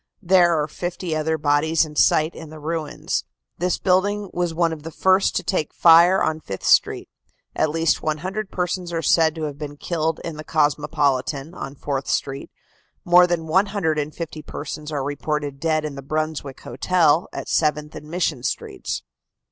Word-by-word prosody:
There 175 Hz, -3 st, +4 dB
are 150 Hz, -, 0 dB
fifty 175 Hz, +1 st, -4 dB
other 160 Hz, +1 st, 0 dB
bodies 155 Hz, +2 st, +2 dB
in 150 Hz, -1 st, -11 dB
sight 155 Hz, +2 st, +3 dB
in 160 Hz, -2 st, -10 dB
the 155 Hz, 0 st, -10 dB
ruins. 155 Hz, 0 st, -3 dB, 0.4 s
This 180 Hz, 0 st, 0 dB
building 200 Hz, +2 st, +1 dB
was 175 Hz, -1 st, -1 dB
one 165 Hz, 0 st, +1 dB
of 155 Hz, -, -8 dB
the 160 Hz, -, -7 dB
first 190 Hz, +3 st, +2 dB
to -, -, 0 dB
take 170 Hz, -6 st, -2 dB
fire 170 Hz, +3 st, +6 dB
on 160 Hz, 0 st, 0 dB
Fifth 100 Hz, -10 st, -7 dB
Street. -, -, +3 dB, 0.5 s
At 155 Hz, -, +2 dB
least 165 Hz, +1 st, +1 dB
100 185 Hz, +7 st, -3 dB
persons 180 Hz, -1 st, -2 dB
are 165 Hz, -1 st, -2 dB
said 160 Hz, +1 st, +3 dB
to 160 Hz, -, -5 dB
have 145 Hz, -1 st, -4 dB
been 145 Hz, -1 st, -6 dB
killed 160 Hz, 0 st, -1 dB
in 165 Hz, -3 st, -5 dB
the 155 Hz, -, -7 dB
Cosmopolitan, 145 Hz, -1 st, 0 dB
on 135 Hz, -5 st, -7 dB
Fourth 135 Hz, -1 st, -3 dB
Street. 135 Hz, 0 st, -2 dB, 0.6 s
More 180 Hz, +1 st, +7 dB
than 170 Hz, -2 st, -1 dB
150 160 Hz, -4 st, -1 dB
persons 150 Hz, +1 st, -7 dB
are 145 Hz, -3 st, -2 dB
reported 145 Hz, 0 st, -3 dB
dead 155 Hz, -1 st, 0 dB
in 150 Hz, -, -4 dB
the 140 Hz, -, -7 dB
Brunswick 155 Hz, -1 st, -3 dB
Hotel, 160 Hz, +4 st, +2 dB
at -, -, -6 dB
Seventh 150 Hz, -1 st, 0 dB
and 150 Hz, -, -10 dB
Mission 165 Hz, -6 st, -1 dB
Streets." -, -, -4 dB
155 Hz, 170 wpm, -22 LUFS, 150-175 Hz, 0.6 s, More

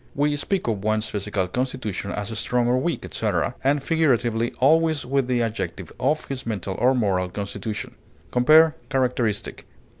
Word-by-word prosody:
We 145 Hz, +1 st, +1 dB
speak 185 Hz, +4 st, -2 dB
of 105 Hz, -4 st, -1 dB
one's 110 Hz, 0 st, +1 dB
physical 100 Hz, -2 st, -2 dB
constitution 125 Hz, -3 st, -3 dB
as 105 Hz, +2 st, -4 dB
strong 125 Hz, -1 st, +1 dB
or 125 Hz, +1 st, +3 dB
weak, 170 Hz, +4 st, -2 dB
etc., -, -, -1 dB
and 140 Hz, +1 st, +2 dB
figuratively, 120 Hz, -8 st, +1 dB
always 160 Hz, +2 st, +3 dB
with 135 Hz, 0 st, 0 dB
the 125 Hz, -2 st, +1 dB
adjective, 115 Hz, 0 st, -4 dB
of 145 Hz, +5 st, +1 dB
his 135 Hz, -1 st, -5 dB
mental 100 Hz, -4 st, -3 dB
or 130 Hz, +3 st, +4 dB
moral 95 Hz, -6 st, +1 dB
constitution. 100 Hz, +2 st, -5 dB, 0.4 s
Compare 155 Hz, +6 st, +6 dB
CHARACTERISTIC. 125 Hz, -6 st, -1 dB
125 Hz, 150 wpm, -24 LUFS, 105-140 Hz, 0.4 s, Compare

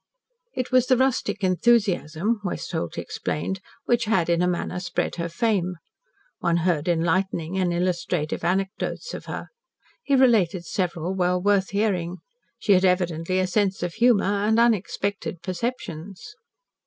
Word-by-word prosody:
It 255 Hz, -1 st, -3 dB
was 255 Hz, -1 st, +4 dB
the 255 Hz, -, +4 dB
rustic 260 Hz, -4 st, 0 dB
enthusiasm, 200 Hz, 0 st, +2 dB
Westholt 165 Hz, -, -3 dB
explained, 190 Hz, +5 st, -3 dB, 0.3 s
which 240 Hz, -1 st, +2 dB
had 190 Hz, -6 st, +1 dB
in 170 Hz, 0 st, +2 dB
a 180 Hz, -, +3 dB
manner 180 Hz, 0 st, -2 dB
spread 175 Hz, -1 st, -2 dB
her 170 Hz, 0 st, -2 dB
fame. 185 Hz, -1 st, 0 dB, 0.6 s
One 170 Hz, 0 st, +1 dB
heard 165 Hz, -4 st, +1 dB
enlightening 175 Hz, +1 st, 0 dB
and 180 Hz, -2 st, +1 dB
illustrative 175 Hz, -2 st, -1 dB
anecdotes 195 Hz, -, -2 dB
of -, -, -7 dB
her. -, -, -6 dB, 0.5 s
He 280 Hz, -, +2 dB
related 205 Hz, -9 st, +3 dB
several 175 Hz, -1 st, -2 dB
well 180 Hz, -1 st, +1 dB
worth 195 Hz, 0 st, +2 dB
hearing. 185 Hz, -4 st, 0 dB, 0.4 s
She 205 Hz, -, +3 dB
had 185 Hz, 0 st, +4 dB
evidently 180 Hz, -1 st, +1 dB
a 185 Hz, -, +2 dB
sense 195 Hz, 0 st, 0 dB
of 175 Hz, -1 st, -2 dB
humour 235 Hz, -1 st, +4 dB, 0.2 s
and 220 Hz, +1 st, +3 dB
unexpected 200 Hz, -5 st, 0 dB
perceptions. 185 Hz, -, -5 dB
185 Hz, 140 wpm, -24 LUFS, 175-210 Hz, 0.6 s, was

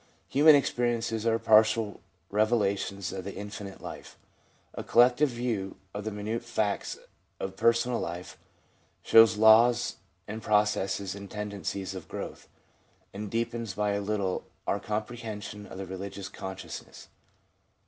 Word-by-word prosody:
Human 150 Hz, +2 st, +7 dB
experiences 120 Hz, -4 st, 0 dB
are 115 Hz, 0 st, +3 dB
partial 110 Hz, -1 st, +4 dB, 0.3 s
revelations 100 Hz, -3 st, 0 dB
of 95 Hz, -1 st, -5 dB
the 100 Hz, -, -6 dB
infinite 100 Hz, -1 st, -7 dB
life. -, -, -9 dB, 0.6 s
A -, -, -5 dB
collective 125 Hz, +5 st, +5 dB
view 120 Hz, -6 st, -3 dB, 0.2 s
of 105 Hz, 0 st, -5 dB
the 110 Hz, -, -2 dB
minute 105 Hz, +3 st, -3 dB
facts 105 Hz, -2 st, -1 dB, 0.4 s
of 95 Hz, 0 st, -4 dB
personal 115 Hz, +3 st, +2 dB
life 85 Hz, -1 st, -5 dB, 0.7 s
shows 115 Hz, -1 st, +7 dB
laws 115 Hz, +3 st, +5 dB, 0.3 s
and 110 Hz, +2 st, -5 dB
processes 105 Hz, -2 st, +1 dB
and 100 Hz, 0 st, -9 dB
tendencies 100 Hz, -2 st, -4 dB
of 95 Hz, -3 st, -8 dB
growth, -, -, -7 dB, 0.7 s
and 105 Hz, +1 st, -5 dB
deepens 115 Hz, -2 st, -2 dB
by 105 Hz, 0 st, +1 dB
a 100 Hz, 0 st, -1 dB
little 100 Hz, -2 st, -2 dB, 0.2 s
our 100 Hz, -, 0 dB
comprehension 105 Hz, -1 st, -5 dB
of -, -, -10 dB
the 95 Hz, -, -5 dB
relgious 95 Hz, +1 st, -7 dB
consciousness. 95 Hz, 0 st, -8 dB
105 Hz, 130 wpm, -29 LUFS, 100-115 Hz, 0.7 s, Human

